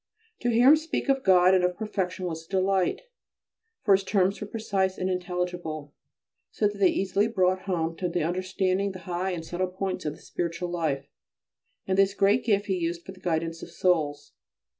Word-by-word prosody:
To 245 - 0
hear 240 +3 +5
him 310 - +8
speak 315 -2 -3
of 270 -1 +2
God 185 -1 +6
and 185 -1 +4
of 180 0 0
perfection 190 -4 -3
was 165 -2 -5
a - - -35
delight, 190 -1 +1 0.8
for 200 - +5
his 195 0 +3
terms 195 0 +1
were 210 - -4
precise 195 -4 -1
and 185 0 -1
intelligible, 180 -4 -3 0.6
so 210 - +1
that 205 0 -6
they 195 - +6
easily 195 +2 +1
brought 185 -4 +1
home 165 -2 -1
to 180 - -1
the 170 -1 -1
understanding 185 +3 0
the 185 - -9
high 180 +1 -2
and 170 -3 -4
subtle 180 +3 -2
points 185 -1 -4
of 150 0 -2
the - - -18
spiritual 175 +1 -3
life 150 -6 -1 0.8
and 190 0 0
this 195 0 +3
great 205 +5 +3
gift 205 -3 +2
he 190 -3 -1
used 170 0 -2
for - - -7
the 190 - -14
guidance 165 -2 -2
of - - -8
souls. 155 -5 0
185 Hz, 195 wpm, -27 LUFS, 175-195 Hz, 0.8 s, him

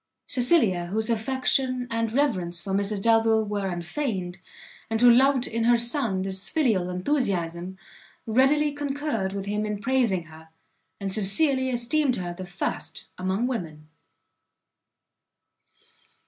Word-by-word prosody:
Cecilia, 235 - +3
whose 220 +5 -1
affection 255 +2 0
and 230 -1 -1
reverence 185 -11 0
for 190 +2 -5
Mrs 200 0 0
Delvile 225 -1 +3
were 205 -1 -2
unfeigned, 180 - -4 0.5
and 225 0 -1
who 245 0 +7
loved 265 +1 +4
in 230 0 -2
her 240 0 +5
son 235 -5 +2
this 190 0 -3
filial 220 - +1
enthusiasm, 180 - -2 0.5
readily 270 +6 +3
concurred 285 -8 -3
with 195 0 -5
him 210 +1 -2
in 210 -1 -3
praising 230 -6 +1
her, 160 0 -15 0.5
and 195 -2 -3
sincerely 260 +7 +2
esteemed 255 +3 +1
her 175 -4 -4
the 185 +1 -8
first 180 +2 -5
among 190 +5 -1
women. 160 -11 -5
220 Hz, 125 wpm, -25 LUFS, 185-255 Hz, 0.5 s, who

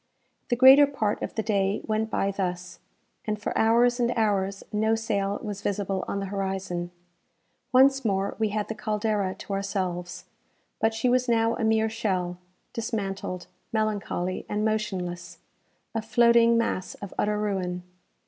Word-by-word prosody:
The 240 - +2
greater 265 +3 +8
part 220 -7 -1
of - - -4
the 220 - -1
day 200 -2 +1
went 220 0 -1
by 200 -2 0
thus, 180 -2 -4 0.5
and 215 -1 -2
for 210 - -3
hours 240 +2 +4
and 240 -1 +2
hours 200 -3 0
no 220 +1 +2
sail 205 -3 -1
was 205 -2 -5
visible 195 -2 -1
on 200 - -2
the 195 - -3
horizon. 190 -3 -3 0.8
Once 270 +1 +5
more 195 -3 0
we 220 -1 +2
had 210 0 -2
the - - -3
"Caldera" 210 -3 -1
to 200 - -7
ourselves; 180 -3 -3 0.5
but 225 0 +1
she 225 +3 0
was 250 0 +2
now 230 0 +2
a - - -3
mere 220 0 +3
shell, 185 -5 -2 0.3
dismantled, 195 -5 -3 0.3
melancholy, 205 -4 -1
and 210 +1 0
motionless 180 -5 -2 0.6
a 225 - -1
floating 235 +1 +4
mass 210 -5 -1
of 200 -2 -9
utter 210 0 +1
ruin! 185 -4 -2
210 Hz, 150 wpm, -26 LUFS, 190-225 Hz, 0.8 s, greater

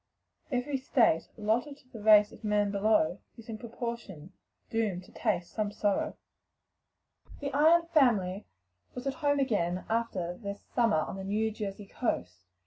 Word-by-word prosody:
"Every 260 +2 0
state, 255 - +2
Allotted 230 +7 0
to 255 - -24
the 225 -4 -10
race 210 -1 +7
of - - -15
man 210 -1 +1
below, 200 -4 +2 0.2
Is 230 0 -13
in 220 -1 -5
proportion, 230 -8 -6 0.4
doom'd 210 -5 -1
to - - -18
taste 175 -3 -1
some 210 -2 -2
sorrow." 205 -1 0 1.1
Rowe. - - -15
The 280 -1 -4
Ion 325 +4 +5
family 225 - +2 0.5
were 250 - -5
at 270 - 0
home 285 -1 +1
again 185 -10 0
after 195 -6 -1
their 200 -2 -4
summer 220 -4 +1
on 190 - -5
the 190 - -5
New 215 +3 0
Jersey 205 -1 -5
coast. 90 - -3
215 Hz, 155 wpm, -30 LUFS, 195-245 Hz, 1.1 s, race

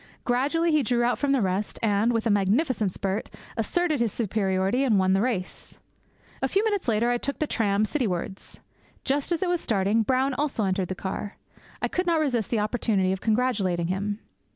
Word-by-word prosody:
Gradually 290 +7 +1
he 305 -1 +4
drew 240 -1 +1
out 245 - +1
from 285 -1 +1
the 270 -5 +2
rest, 190 +2 -1
and, 215 +2 +2
with 230 -1 -1
a 225 - +3
magnificent 210 - +1
spurt, 195 +3 -3 0.3
asserted 310 +6 0
his 230 -3 +1
superiority 195 +2 0
and 235 -7 +3
won 190 0 +3
the 195 +1 +3
race. 220 -7 -3 0.6
A - - +2
few 400 +2 +1
minutes 410 -7 -1
later 230 +1 +2
I 240 - 0
took 280 +3 -3
the 310 - 0
tram 210 -6 +1
citywards. 195 - -3 0.5
Just 280 +4 0
as 340 +1 +1
it - - 0
was 350 -1 0
starting, 205 +1 +1
Brown 260 +4 +1
also 265 -6 -1
entered 190 -1 0
the 185 - -4
car. 195 +2 -5 0.5
I - - +3
could 360 0 -2
not 335 -2 +3
resist 245 -9 0
the 235 - 0
opportunity 210 -3 +1
of 190 0 -3
congratulating 215 -7 +1
him. 200 +2 -2
225 Hz, 195 wpm, -26 LUFS, 195-270 Hz, 0.6 s, he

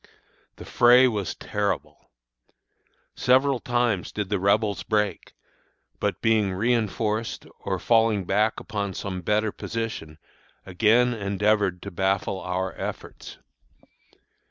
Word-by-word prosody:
The - - -11
fray 125 +2 +6
was 105 -6 -2
terrible. 105 -1 -3 1.1
Several 130 +1 +3
times 120 -7 0
did 105 -3 -4
the 100 -2 0
Rebels 100 +1 +1
break, 105 -2 -1 0.7
but, - - -2
being 110 -3 +3
reënforced 110 +1 -1
or - - -2
falling 110 -4 +2
back 105 +4 +1
upon 100 -3 -4
some 95 -2 -4
better 105 +3 0
position, 110 -11 -5 0.5
again 115 +6 +3
endeavored 100 -3 0
to - - -7
baffle 95 +1 -1
our 90 0 -3
efforts. - - -7
105 Hz, 110 wpm, -25 LUFS, 95-115 Hz, 1.1 s, fray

